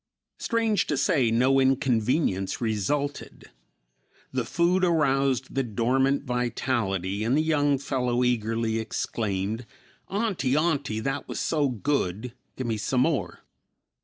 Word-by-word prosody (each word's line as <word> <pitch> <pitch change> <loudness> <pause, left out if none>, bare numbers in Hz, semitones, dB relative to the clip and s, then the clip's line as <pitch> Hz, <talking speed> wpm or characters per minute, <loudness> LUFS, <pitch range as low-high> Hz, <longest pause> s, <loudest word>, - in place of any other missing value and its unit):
Strange 225 -4 +1
to 145 - 0
say, 130 -4 +2
no 130 +4 +3
inconvenience 125 - +1
resulted. 125 +6 -2 0.8
The 130 -2 -1
food 175 +7 +1
aroused 135 -6 +1
the 135 - +1
dormant 130 +4 +1
vitality 115 - -1
and 120 +5 +2
the 155 - +2
young 145 -3 +2
fellow 125 -3 -1
eagerly 115 -1 0
exclaimed, 110 0 -3 0.4
"Auntie, 190 - 0
Auntie, 140 -9 0
that 135 +4 -3
was - - -4
so 150 -3 +1
good. 120 -3 -2 0.2
Give 130 - -4
me 115 -2 -1
some 125 +5 0
more." 150 -1 -1
130 Hz, 120 wpm, -26 LUFS, 115-145 Hz, 0.8 s, no